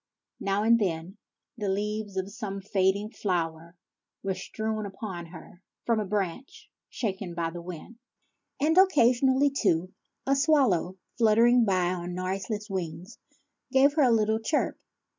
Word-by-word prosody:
Now 200 +1 0
and 230 +1 +5
then 180 0 -2 0.4
the 205 -2 -1
leaves 205 0 -2
of 190 +1 -2
some 200 -3 -5
fading 195 +1 0
flower 170 -4 -3 0.5
were 195 -1 0
strewn 215 +3 -4
upon 190 -4 -7
her 170 +1 -13 0.2
from 230 -2 +2
a 210 - -1
branch 205 +5 -4 0.2
shaken 195 -5 -4
by 165 -1 -2
the 175 +1 -7
wind; 180 +7 -9 0.6
and, 310 +3 +2
occasionally, 265 -5 +4
too, 185 -9 0 0.3
a 275 - +3
swallow, 260 - +2 0.2
flitting 230 +2 +5
by 185 -3 +1
on 175 0 -5
noiseless 195 +3 -3
wings, 180 0 -5 0.5
gave 275 +1 +5
her 305 - +2
a 260 - +5
little 220 -1 +2
chirp. 290 +7 -1
205 Hz, 140 wpm, -27 LUFS, 180-230 Hz, 0.6 s, and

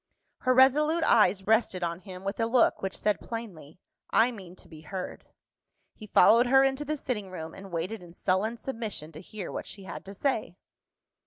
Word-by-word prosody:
Her 255 - +2
resolute 300 +5 +4
eyes 195 -4 +4
rested 215 -4 +2
on 170 0 -2
him 185 -1 -10
with 195 +3 -4
a 225 - +2
look 235 0 +3
which 190 -1 -3
said 210 -1 0
plainly, 185 -10 -8 0.3
"I 235 +3 +4
mean 190 -6 -11
to - - -15
be 155 -2 -13
heard." 180 +4 -7 0.7
He 215 - -12
followed 235 +4 +6
her 270 +2 +6
into 270 +2 +1
the 305 +1 -3
sitting 210 -8 -3
room, 160 -3 -7
and 195 0 -11
waited 175 +6 -3
in 175 -1 -14
sullen 205 +5 0
submission 220 - -5
to 155 - -10
hear 195 0 -7
what - - -5
she 200 - -8
had 190 - -8
to 195 +1 -9
say. 220 -7 -1
210 Hz, 190 wpm, -28 LUFS, 185-240 Hz, 0.7 s, followed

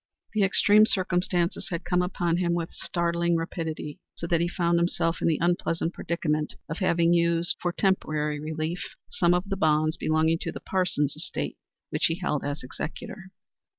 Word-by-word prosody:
The 215 - +1
extreme 205 +2 +6
circumstances 180 -3 0
had 170 -2 -4
come 180 0 +2
upon 175 -2 0
him 170 -1 +1
with 170 -1 -3
startling 170 0 0
rapidity, 160 -2 -4 0.2
so - - -5
that 170 -1 +2
he 170 - +2
found 170 -1 +1
himself 170 -1 0
in - - +2
the 160 -3 +3
unpleasant 170 0 0
predicament 155 -3 -1
of 160 - -4
having 170 -3 +3
used 170 0 +2
for 175 - 0
temporary 155 -6 0
relief 155 +3 -4 0.2
some 175 0 +3
of 180 +3 -1
the 195 -1 -2
bonds 155 -2 +2
belonging 160 +1 +2
to - - -3
the - - -7
Parsons 175 -7 0
estate - - -4 0.4
which - - +2
he 165 - -1
held 170 -5 -2
as 145 0 -3
executor. 185 +8 -7
170 Hz, 170 wpm, -27 LUFS, 160-180 Hz, 0.4 s, extreme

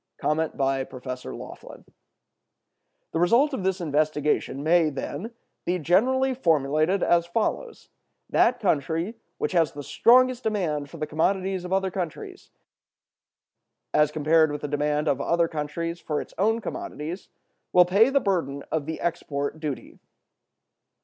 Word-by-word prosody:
(345) 135 -4 -3 1.3
The 165 - -1
result 240 - +4
of 205 - -3
this 190 0 0
investigation 150 -3 0
may, 165 0 +4
then, 150 - -5 0.3
be 180 +1 0
generally 255 - +2
formulated 160 - +1
as 170 0 +3
follows: 230 - -2 0.4
That 245 +1 +3
country 165 - 0 0.2
which - - -2
has 170 -4 +2
the 145 0 -7
strongest 255 - +4
demand 170 - -1
for 165 - -10
the 155 - -2
commodities 185 +4 0
of 180 - -7
other 190 0 +1
countries 175 -4 -6 1.4
as 150 0 +4
compared 155 +1 +3
with 145 0 -5
the 150 - -3
demand 150 +1 0
of 140 -1 +1
other 170 +2 +2
countries 165 +2 -4
for 150 -2 -2
its - - -8
own 225 +3 +2
commodities 195 - -6 0.4
will 180 0 +6
pay 200 +7 +4
the 275 +1 +3
burden 165 - -1
of 155 -2 -1
the 160 - -4
export 145 -3 -3
duty. 150 -4 -6
165 Hz, 130 wpm, -25 LUFS, 150-195 Hz, 1.4 s, will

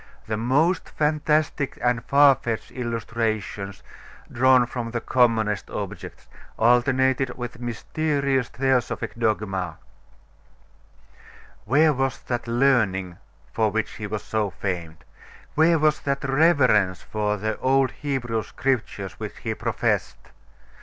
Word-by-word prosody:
The 110 - -2
most 140 - +1
fantastic 150 -1 0
and 120 -2 0
far 140 +1 +6
fetched 115 -3 -4
illustrations, 110 -4 -3 0.5
drawn 130 0 +4
from 120 -1 -5
the 120 0 -2
commonest 115 -5 +1
objects, - - -7 0.3
alternated 130 +2 +2
with 120 -2 -6
mysterious 135 +2 -1
theosophic 130 -1 -1
dogma. 105 -5 -1 1.9
Where 150 +6 +4
was 135 0 -1
that 120 -1 -3
learning 110 -8 +1 0.3
for 110 -1 +2
which 110 +1 -3
he 105 - -5
was 105 0 -4
so 110 -2 -1
famed? 85 -4 -5 0.5
Where 165 +2 +4
was 155 0 +2
that 140 -1 -2
reverence 135 - +3
for 105 -1 -1
the 110 +2 -3
old 135 0 +2
Hebrew 125 -6 -2
Scriptures 105 -8 -3
which - - -6
he - - -3
professed? - - -2
120 Hz, 110 wpm, -24 LUFS, 110-135 Hz, 1.9 s, far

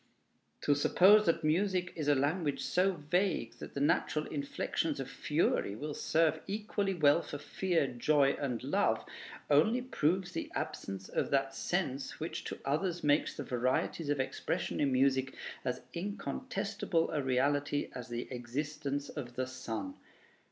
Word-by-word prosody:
To 145 - +3
suppose 195 +8 +6
that 165 0 +2
music 180 +3 +1
is 155 -3 -3
a 145 - +5
language 145 +2 0
so 190 +2 +2
vague 170 - -1
that - - -9
the - - -1
natural 150 +1 +2
inflections 140 -2 -2
of - - -3
fury 100 - 0
will 150 +6 -4
serve 160 0 +2
equally 205 -1 -1
well 150 0 +5
for 145 - -6
fear, 175 +1 0
joy, 140 +3 +3
and 125 -5 -2
love, - - +1 0.4
only 160 - +4
proves 185 -6 0
the - - -4
absence 95 -1 -4
of - - -1
that 135 -1 +1
sense 135 -4 -2
which 160 +2 -4
to - - -4
others 170 +5 0
makes 145 0 +2
the - - -3
varieties 130 +5 0
of 145 -1 +1
expression 130 - -2
in 140 -2 +2
music 130 0 +2 0.3
as 125 0 -2
incontestable 200 -1 -2
a 150 - 0
reality 145 +2 +1
as 125 -1 -6
the 120 0 -4
existence 140 +3 -3
of 120 -1 -7
the 130 - 0
sun.... 130 - -5
145 Hz, 150 wpm, -33 LUFS, 135-175 Hz, 0.4 s, suppose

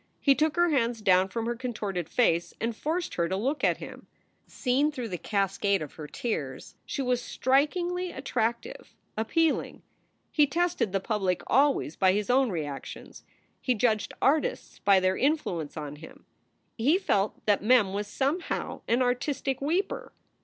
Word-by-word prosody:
He 280 - +5
took 305 +2 +1
her 345 0 +3
hands 235 -5 +1
down 185 -2 +4
from 225 +3 -3
her 240 +1 -1
contorted 210 -8 -4
face 175 -9 +1
and 230 0 -2
forced 325 +8 -2
her 170 -1 0
to 190 - 0
look 270 +8 -1
at - - +3
him. - - -10 0.4
Seen 280 +4 +1
through 250 -5 -5
the 180 -3 -4
cas 195 -2 -1
cade 200 -1 +2
of 145 - -9
her 150 -2 -8
tears 145 - -4
she 275 - -2
w 250 - 0
r - - +5
as 245 - -1
strikingly 345 +9 0
attractive, 235 -3 -3 0.2
appealing. 310 +9 0 0.5
He 295 -2 +4
tested 335 - 0
the 195 0 0
public 195 -4 -1
always 270 - +2
by 185 -1 +4
his 210 +4 0
own 260 0 +4
reactions. 150 -7 -6 0.4
He 255 - +1
judged 215 -1 0
artists 315 - +1
by 195 -1 +5
their 185 0 +1
influence 185 - -1
on 150 -1 -6
him. 160 - -13 0.5
He 285 +10 +4
felt 205 - 0
that 205 -2 +3
Mem 210 -3 +4
was 205 +1 -2
somehow 280 - -2
an 240 +3 +3
artistic 265 +2 -1
weeper. 345 +8 -1
235 Hz, 165 wpm, -28 LUFS, 195-280 Hz, 0.5 s, He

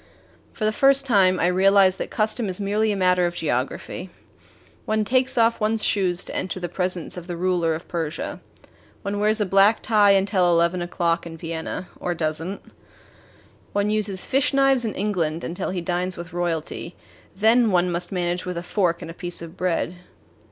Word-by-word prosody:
For 215 - -3
the 215 - +2
first 275 +3 +4
time, 190 -7 +4
I - - +2
realized 190 +1 +4
that - - -3
custom 215 0 0
is 185 - -2
merely 210 +2 +1
a - - -1
matter 180 -2 +3
of 175 - -5
geography. 145 +5 -3 0.8
One 215 0 0
takes 255 +3 +2
off 230 0 +3
one's 215 +1 +1
shoes 185 -3 +1
to - - -7
enter 185 0 -3
the 175 - -3
presence 180 -1 -3
of 175 -1 -8
the 175 -1 -5
ruler 175 -2 +1
of 160 - -9
Persia. 165 -2 -4 0.6
One 200 +1 -3
wears 215 +2 +2
a 210 - +1
black 195 +3 +4
tie 210 -3 +5
until 195 -2 +2
eleven 170 +1 +2
o'clock 170 -1 -1
in 165 -1 -9
Vienna 165 +2 -5
or 175 -1 -2
does 155 -1 -2
n't. 190 +4 -6 1.1
One 205 +1 +1
uses 210 -3 -1
fish 270 +1 +1
knives 270 -3 +3
in 220 - -3
England 170 -5 -1
until 180 +3 -3
he 180 -1 -3
dines 180 +1 -2
with 170 -1 -8
royalty 170 0 -3 0.4
then 225 +3 +4
one 180 -2 +2
must 175 0 -2
manage 175 -1 -1
with 180 -1 -5
a 170 - -4
fork 175 -2 0
and 165 - -7
a - - -10
piece 175 0 -5
of 165 +1 -9
bread. 180 -1 -1
185 Hz, 185 wpm, -23 LUFS, 175-210 Hz, 1.1 s, tie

